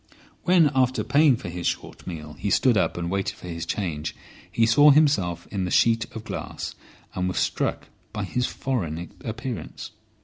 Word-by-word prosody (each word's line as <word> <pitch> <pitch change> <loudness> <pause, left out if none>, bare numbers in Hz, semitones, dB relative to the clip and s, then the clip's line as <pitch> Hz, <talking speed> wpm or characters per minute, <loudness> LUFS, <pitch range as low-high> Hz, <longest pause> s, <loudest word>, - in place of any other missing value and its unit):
When, 175 -5 +5
after 130 -1 +2
paying 145 -2 +5
for 100 - -7
his 85 0 -3
short - - -4
meal, 75 -4 -6
he 90 +6 -3
stood 125 +3 +4
up 95 - +1
and 85 0 -3
waited 100 0 -1
for - - -11
his 85 -1 -5
change, 80 -6 -3 0.4
he 115 - +3
saw 145 +6 +7
himself 135 - +3
in 100 -2 -1
the 90 - -2
sheet 115 +4 +3
of 110 - -6
glass, - - -5 0.4
and 90 0 -1
was 90 - -3
struck - - -1 0.2
by 105 -1 -3
his 125 +6 -1
foreign 85 - -3
appearance. 115 0 -5
105 Hz, 175 wpm, -25 LUFS, 85-130 Hz, 0.4 s, saw